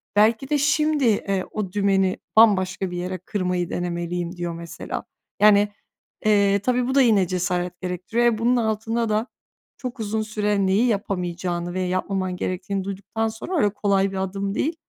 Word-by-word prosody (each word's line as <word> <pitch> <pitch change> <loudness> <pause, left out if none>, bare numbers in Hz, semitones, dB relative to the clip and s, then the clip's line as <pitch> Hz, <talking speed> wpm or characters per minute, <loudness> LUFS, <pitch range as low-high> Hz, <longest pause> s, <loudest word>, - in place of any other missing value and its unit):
"Belki 220 +5 +3
de 300 - +2
şimdi, 300 0 +2
eee, 195 -4 +1
o 205 -4 -3
dümeni 195 -1 +2 0.2
bambaşka 190 -4 +4
bir 175 - -4
yere 180 +1 -3
kırmayı 180 -3 -2
denemeliyim." 175 0 -3
diyor 175 -1 -3
mesela. 170 0 -6 0.4
Yani, 205 -1 +6 0.6
eee, 200 -1 +4
tabii, 250 +3 0
bu 265 - -1
da 275 - +6
yine 210 -7 +4
cesaret 180 0 -2
gerektiriyor, 185 +6 -1
eee, 235 -2 +3
bunun 235 +3 +2
altında 225 0 0
da 215 +3 0 0.5
çok 250 -1 -6
uzun 220 0 -1
süre 210 -2 0
neyi 195 +5 +3
yapamayacağını 180 -5 -2
ve 185 - -2
yapmaman 185 0 -1
gerektiğini 185 +2 -3
duyduktan 200 +3 -3
sonra 225 +12 -4
öyle 210 -9 +3
kolay 195 -1 +1
bir 195 - -5
adım 195 +1 -2
değil 315 +7 0
200 Hz, 160 wpm, -23 LUFS, 185-220 Hz, 0.6 s, Yani